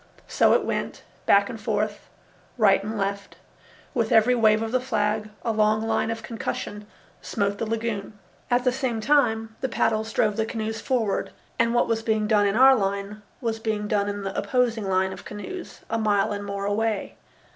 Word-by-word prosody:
So - - +4
it - - +2
went, - - -3 0.2
back - - +5
and - - -7
forth, - - -2 0.5
right 200 -4 +4
and 215 +2 -4
left; 200 0 -3 0.6
with 230 -4 0
every 225 +3 +5
wave 220 -2 +3
of 225 - -3
the 255 - +2
flag 215 -4 -1 0.2
a 230 - +1
long 215 0 +2
line 225 0 0
of 225 -1 -4
concussion 210 -2 -5 0.3
smote 200 -1 -2
the 225 - -2
lagoon. 220 -2 -3 0.3
At 245 0 +2
the 250 - +3
same 250 -3 -2
time 225 -4 +2
the 265 - -1
paddles 220 -1 0
drove 210 -3 +1
the 220 - +1
canoes 220 -1 -4
forward 230 -6 0 0.3
and 230 +1 +2
what 240 - +3
was 225 -1 0
being 220 -1 0
done 210 -1 +3
in 200 - 0
our 265 +2 +7
line 200 0 -2 0.2
was 225 -2 -2
being 215 -2 -2
done 205 -1 +1
in 205 0 -4
the 195 0 -4
opposing 225 -1 0
line 190 0 +1
of - - -10
canoes 345 - -8
a 225 - -1
mile 210 -2 +2
and 205 0 -3
more 200 0 -4
away. 215 0 -1
220 Hz, 190 wpm, -25 LUFS, 205-230 Hz, 0.6 s, our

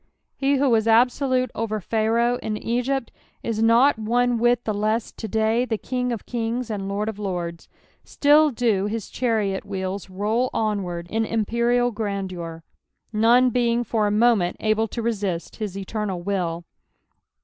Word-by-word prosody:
He 275 +1 +1
who 275 +1 +2
was 225 -3 +3
absolute 255 +2 +3
over 215 -1 -2
Pharaoh 230 +4 +1
in 215 - -3
E^ypt 245 +4 -1 0.3
is 225 -1 -2
not 230 +3 +4
one 240 +2 +1
whit 240 0 +2
the 215 - 0
las 215 +2 -1
to 220 - -7
day 220 +3 +1
the 225 -4 -2
Ring 250 -1 0
of 230 -4 -4
kings 235 0 -3
and 195 -2 -3
Lord 205 +2 -2
of 220 -2 -4
lords; 175 -4 -4 0.3
still 300 +1 +4
do 225 -6 +1
his 220 -1 -4
chariot 215 -6 0
wheels 190 0 -4
roll 215 +6 0
onward 195 -6 -1
in 225 +1 +1
imperial 235 +2 +1
grandeur, 190 -6 -4 0.5
none 240 +4 +4
being 240 0 +1
for 215 -2 0
a - - 0
moment 210 -4 +3
able 220 +1 +1
to 230 +2 -5
rcust 200 -7 -2
his 205 -4 -4
eternal 195 -1 -3
will. 175 -3 -2
220 Hz, 155 wpm, -23 LUFS, 200-240 Hz, 0.5 s, not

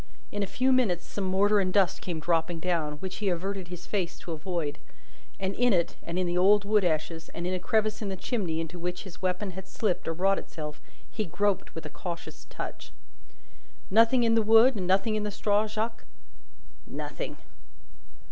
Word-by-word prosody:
In 205 - -2
a 200 - 0
few 255 +7 +2
minutes, 200 -10 +2
some 200 - -4
mortar 200 +3 +4
and 185 -2 +1
dust 190 -2 +3
came 170 -3 -3
dropping 165 +1 0
down, 160 -4 0
which 185 +5 -6
he 205 -2 0
averted 185 +1 -2
his 180 0 -8
face 185 -4 -2
to 170 - -8
avoid; 160 -2 -3 0.6
and 190 0 -1
in 245 +1 +3
it, 170 -2 +1
and 170 +1 -4
in 185 - +2
the 175 0 -1
old 200 +2 +5
wood 210 0 +3
ashes, 165 -1 -1
and 170 - -3
in 180 - 0
a 185 - -1
crevice 215 +3 +1
in 205 - -2
the 190 - -2
chimney 185 -5 -2
into 165 +2 -5
which 180 +1 -3
his 190 -3 -11
weapon 185 +2 -1
had 190 +1 -8
slipped 205 -6 -1
or 165 - 0
wrought 195 +4 +2
itself, 150 -2 -7 0.3
he 215 - -1
groped 195 +3 0
with 160 - -6
a - - -5
cautious 170 +2 -7
touch. - - -7 1.0
"Nothing 230 +4 +5
in 230 -1 +4
the 225 - +5
wood, 225 +4 +6
and 185 -4 -2
nothing 195 +4 +3
in 215 - 0
the 210 - -1
straw, 205 +1 +1
Jacques?" 220 +2 -3 0.8
"Nothing." - - -5
190 Hz, 195 wpm, -28 LUFS, 175-210 Hz, 1.0 s, wood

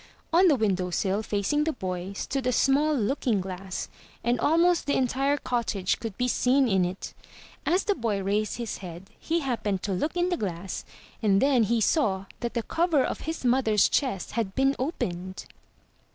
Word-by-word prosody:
On 365 +3 +6
the 305 - +5
window 190 -6 0
sill, 195 +3 0
facing 215 +8 0
the 320 +1 0
boy, 185 -3 -4
stood 265 +5 -3
a - - +3
small 280 +5 +3
looking 240 -2 0
glass; 185 0 -5 0.4
and 240 +1 +1
almost 335 +2 +3
the 285 - +2
entire 270 +3 +1
cottage 230 -8 -1
could 225 -4 -6
be 250 - +1
seen 255 +2 +3
in 190 -4 +3
it. 180 +2 -5 0.5
As 360 +3 +3
the 410 - +2
boy 220 - -2
raised 210 +3 0
his 235 -3 -4
head, 180 +1 -10
he 335 +1 -1
happened 220 -8 -2
to 205 - -2
look 300 - -2
in 350 +1 +2
the 355 - 0
glass 185 - -4 0.4
and 200 -3 +3
then 270 -1 +4
he 230 +2 +1
saw 195 - +1
that 235 0 -4
the 235 - 0
cover 325 -2 +2
of - - -3
his 320 -5 -4
mother's 240 -4 +4
chest 250 -10 -1
had 215 -4 -2
been 270 +1 +3
opened. 185 - -3
235 Hz, 180 wpm, -27 LUFS, 195-275 Hz, 0.5 s, On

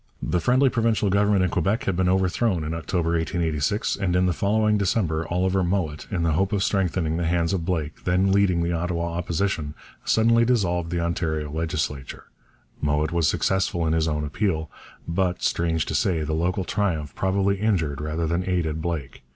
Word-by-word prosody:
The 90 - -1
friendly 130 +2 +3
provincial 115 -4 +1
Government 100 -1 +3
in 90 - 0
Quebec 100 +7 0
had 100 - -1
been 90 0 +1
overthrown 95 0 +1
in 75 +1 -3
October 85 +1 -1
1886, 80 +2 0
and 95 -3 0
in 90 0 +3
the 90 - +2
following 105 +2 +2
December 95 -6 0
Oliver 95 +2 +1
Mowat, 85 -5 -2
in 90 -4 -1
the 85 - +2
hope 95 +6 +1
of 100 -1 +1
strengthening 90 -5 0
the 85 -1 -1
hands 85 +1 +1
of 85 -4 -2
Blake, 80 -4 -3
then 90 +2 +2
leading 95 -4 +3
the 85 - -1
Ottawa 85 0 -2
Opposition, 85 -3 -2 0.3
suddenly 115 +1 +3
dissolved 90 -8 +1
the 85 0 -1
Ontario 80 -3 -2
legislature. 75 -4 -3 0.6
Mowat 75 +2 +1
was 85 -2 +2
successful 95 -2 0
in 80 - +1
his 80 0 +1
own 75 -1 -1
appeal. 80 0 -2 0.4
But, 90 +1 -1
strange 80 -2 0
to - - -4
say, 85 -5 +1
the 75 +1 -2
local 90 +4 0
triumph 85 -8 -1
probably 100 +1 +1
injured 80 -10 0
rather 80 +2 -2
than 85 +3 0
aided 80 -4 -1
Blake. 80 -6 -4
85 Hz, 180 wpm, -24 LUFS, 80-95 Hz, 0.6 s, friendly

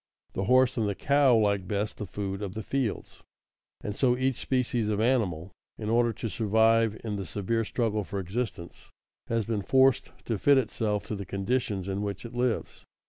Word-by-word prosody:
The 95 - -2
horse 130 +3 +4
and 110 -3 +1
the 100 - -2
cow 140 -2 +4
like 100 -3 +1
best 105 +2 -2
the 105 - -5
food 95 +1 -4
of 100 -1 -5
the 110 - -4
fields, 130 -4 -3 0.6
and 105 - -4
so 125 0 +2
each 130 -1 0
species 125 -4 0
of 105 -1 0
animal, 100 -8 +1 0.3
in 110 0 -3
order 120 0 +3
to 115 - -5
survive 110 +1 +2
in 105 -3 -3
the 100 - -4
severe 105 +6 -1
struggle 110 -2 -1
for 100 - -6
existence, 95 -2 -5 0.4
has 115 -2 0
been 110 -2 -1
forced 130 +4 +3
to 115 -4 -2
fit 140 +5 +5
itself 110 -4 0
to 110 - -4
the 100 - -5
conditions 100 0 -2
in 100 +1 -2
which 100 +1 -4
it 115 - -8
lives. 120 -1 -2
110 Hz, 190 wpm, -28 LUFS, 100-120 Hz, 0.6 s, fit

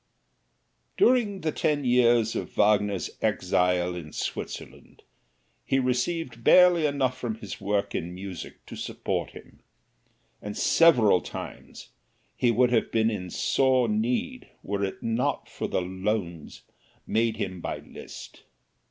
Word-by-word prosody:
During 240 - +3
the 155 - 0
ten 145 -2 0
years 120 -2 +3
of - - -4
Wagner's 105 -3 +2
exile 90 0 +1
in 85 -4 -8
Switzerland - - -6 0.6
he 135 - +1
received 125 0 -1
barely 175 -1 +6
enough 135 -3 0
from 120 -4 -4
his 105 -4 -8
work 100 0 -1
in 85 +2 -4
music 95 -2 -8
to - - -9
support - - -3
him, - - -14 0.8
and 105 0 -6
several 120 - +5
times - - -9 0.5
he 125 - +2
would 120 +2 +3
have 115 - +1
been 110 0 +2
in 90 -4 -5
sore 130 +6 +2
need 245 +4 -1
were 100 0 -2
it 95 - -4
not 115 +2 -1
for - - -5
the - - -1
"loans" 95 -2 -4 0.4
made 115 0 0
him 95 -2 -4
by - - -3
Liszt. - - -11
115 Hz, 130 wpm, -26 LUFS, 100-135 Hz, 0.8 s, barely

